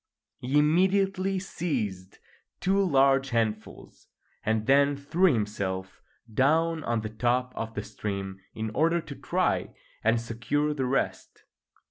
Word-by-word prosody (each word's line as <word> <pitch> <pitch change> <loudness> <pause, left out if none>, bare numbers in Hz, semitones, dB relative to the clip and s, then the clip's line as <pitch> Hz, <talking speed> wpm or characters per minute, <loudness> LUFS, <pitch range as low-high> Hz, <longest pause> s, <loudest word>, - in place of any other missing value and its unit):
He 130 +4 0
immediately 190 +5 +2
seized 115 - -3 0.4
two 195 +2 +2
large 135 -4 +3
handfuls, 110 -2 -3 0.4
and 110 0 0
then 140 +2 +4
threw 170 +6 +2
himself 100 -5 -3 0.3
down 160 +6 +2
on 115 -1 0
the 110 - -4
top 125 +3 0
of 115 0 -5
the 105 - -3
stream 100 -2 -5 0.2
in 110 0 -3
order 165 +8 +2
to 150 -3 -8
try - - -1 0.3
and 115 +1 +3
secure 120 +6 -1
the 135 -3 -2
rest. 135 +2 -2
130 Hz, 125 wpm, -27 LUFS, 110-155 Hz, 0.4 s, then